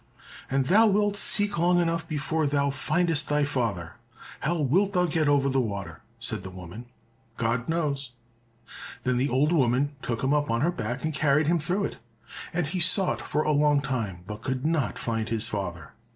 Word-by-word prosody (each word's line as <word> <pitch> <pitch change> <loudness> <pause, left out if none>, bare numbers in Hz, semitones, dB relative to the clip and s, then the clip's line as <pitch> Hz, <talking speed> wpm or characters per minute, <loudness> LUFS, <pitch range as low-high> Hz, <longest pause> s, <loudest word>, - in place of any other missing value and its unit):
"And 135 0 +1
thou 215 +9 +5
wilt 205 0 +2
seek 205 -2 +2
long 175 +1 +3
enough 165 -1 0
before 155 +1 -1
thou 140 0 +1
findest 160 +3 0
thy 150 0 +2
father. 115 - -2 0.4
How 170 +4 -1
wilt 185 +8 +2
thou 180 -2 +3
get 160 -2 0
over 140 -1 +3
the 135 -1 +2
water?" 100 -4 -5 0.2
said 115 -3 -4
the 95 - -8
woman. 95 +6 -10 0.5
"God 115 +2 -1
knows." 140 -6 -1 0.9
Then 125 -1 +1
the 135 +3 +1
old 140 +5 +2
woman 140 -1 +2
took 115 0 -3
him 135 +2 +2
up 145 0 +1
on 115 +1 0
her 170 +4 +2
back 120 -5 -4
and 160 0 -1
carried 150 0 +2
him 170 +3 +2
through 180 +7 -1
it, - - -4 0.5
and 175 -1 -1
he 175 +5 -3
sought 180 +2 +4
for 150 - -1
a 155 - +1
long 145 0 +3
time, 115 -10 -3
but 105 +2 -7
could 130 +3 -3
not 155 -5 0
find 115 -1 -2
his 110 -1 -2
father. 85 -6 -5
145 Hz, 190 wpm, -26 LUFS, 120-165 Hz, 0.9 s, thou